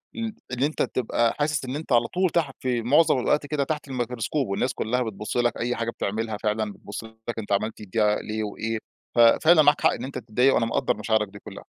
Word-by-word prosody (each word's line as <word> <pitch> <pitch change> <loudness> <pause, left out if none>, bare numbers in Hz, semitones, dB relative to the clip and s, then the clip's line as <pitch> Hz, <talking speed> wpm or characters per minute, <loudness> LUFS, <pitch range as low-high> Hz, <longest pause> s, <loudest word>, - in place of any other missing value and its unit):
ال 225 -2 -3 0.2
اللي 125 +2 +1
أنت 155 - -2
تبقى 120 -1 +1
حاسس 150 -2 0
إن 130 - -4
أنت 155 -1 -6
على 120 -1 +4
طول 185 0 +1
تحت، 155 -5 0
في 125 -2 -1
معظم 140 +3 +4
الاوقات 145 +4 +1
كده، 145 -1 -1
تحت 150 0 -3
الميكروسكوب، 125 +2 -2
والناس 125 +6 -1
كلّها 125 +3 -1
بتبص 110 0 -4
لك، 120 -1 +1
أي 120 +1 -1
حاجة 115 0 -2
بتعملها 110 +1 -3
فعلًا 105 -1 -1
بتبص 100 +3 -8
لك، 110 +1 -7
أنت 105 - -7
عملت 110 +2 -1
دي 105 - -10 0.3
ليه 110 0 -3
وإيه، 110 +2 -3 0.4
ف - - +1
فعلًا 155 +8 +6
معاك 145 0 +4
حق - - +5
إن - - -5
أنت 135 0 -5
تتضايق، 125 +3 +2
وأنا 115 - +2
مقدّر 115 - 0
مشاعرك 105 0 +1
دي 100 +1 -12
كلّها. - - -11
120 Hz, 220 wpm, -25 LUFS, 110-140 Hz, 0.4 s, فعلًا